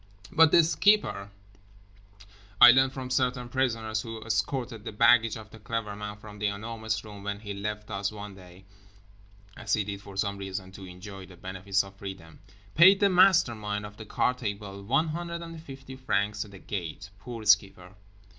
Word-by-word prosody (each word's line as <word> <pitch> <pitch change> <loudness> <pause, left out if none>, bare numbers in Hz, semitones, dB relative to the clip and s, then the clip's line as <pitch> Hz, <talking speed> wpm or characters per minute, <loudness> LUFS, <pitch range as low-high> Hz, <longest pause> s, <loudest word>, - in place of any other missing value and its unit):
But 160 -1 +6
The 170 - +7
Skipper, 165 - +2 1.3
I 120 - +11
learned 130 +1 +4
from 130 -1 -6
certain 125 -1 0
prisoners 115 -4 -1
who 115 -1 -7
escorted 115 +1 -2
the - - -5
baggage 115 +1 +4
of 110 -1 -12
The 110 - -12
Clever 105 -1 -4
Man 105 0 -6
from 105 0 -12
The 105 - +1
Enormous 110 +1 -3
Room 105 -2 -10
when 100 0 -4
he 105 -2 -6
left 105 +1 -5
us 100 +1 -2
one 105 -1 -8
day 95 0 -15 0.9
(as - - -3
he 110 - 0
did 100 0 -6
for 100 -1 -11
some 100 0 -1
reason, 95 -1 -6
to 95 0 -10
enjoy 95 +1 -10
the 90 - -15
benefits 95 +2 -1
of 100 0 -14
freedom), 95 -5 -9 0.3
paid 190 +5 +7
the 200 - +4
mastermind 120 - +3
of 105 0 -11
the 110 - -9
card 125 +4 0
table 100 -1 -5
150 160 +1 -3
francs 105 -4 -1
at 105 - -14
the 100 - -12
gate—poor 100 +6 -7
Skipper! 100 -3 +2
105 Hz, 165 wpm, -28 LUFS, 100-125 Hz, 1.3 s, I